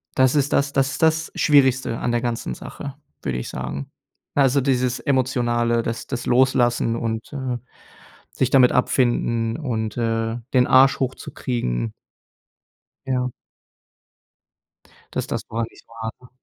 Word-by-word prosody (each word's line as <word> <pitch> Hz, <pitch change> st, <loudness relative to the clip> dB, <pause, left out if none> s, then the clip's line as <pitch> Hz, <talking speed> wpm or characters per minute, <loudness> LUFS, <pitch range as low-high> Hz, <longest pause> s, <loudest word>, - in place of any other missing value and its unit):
das 130 Hz, +1 st, +4 dB
ist 145 Hz, -1 st, +2 dB
das 140 Hz, 0 st, +2 dB
das 135 Hz, 0 st, +2 dB
ist -, -, -5 dB
das 160 Hz, 0 st, +2 dB
Schwierigste 130 Hz, -5 st, +3 dB
an 120 Hz, -, -1 dB
der 120 Hz, 0 st, +1 dB
ganzen 120 Hz, -, -2 dB
Sache, 140 Hz, -1 st, -8 dB, 0.3 s
würde 65 Hz, -3 st, -2 dB
ich 60 Hz, -, -5 dB
sagen. 65 Hz, +2 st, -5 dB, 0.5 s
Also 140 Hz, -1 st, +4 dB
dieses 125 Hz, -2 st, +1 dB
Emotionale, 120 Hz, -4 st, +1 dB
das 115 Hz, 0 st, -4 dB
das 125 Hz, -3 st, -4 dB
Loslassen 120 Hz, -2 st, +3 dB
und, 115 Hz, -1 st, -3 dB
äh, 130 Hz, -3 st, -2 dB, 0.7 s
sich 130 Hz, -, 0 dB
damit 130 Hz, -3 st, +6 dB
abfinden 120 Hz, -3 st, +1 dB
und, 115 Hz, -8 st, -3 dB
äh, 115 Hz, -1 st, 0 dB, 0.2 s
den 125 Hz, -1 st, +4 dB
Arsch 135 Hz, +1 st, +6 dB
hochzukriegen. 120 Hz, -, -2 dB, 1.1 s
Ja. 125 Hz, -1 st, 0 dB, 1.8 s
Dass -, -, -2 dB
das -, -, -4 dB
gar 115 Hz, +1 st, -2 dB
nicht -, -, -19 dB
war, 115 Hz, -1 st, -5 dB
ne? 125 Hz, -, -15 dB
125 Hz, 135 wpm, -22 LUFS, 115-130 Hz, 1.8 s, damit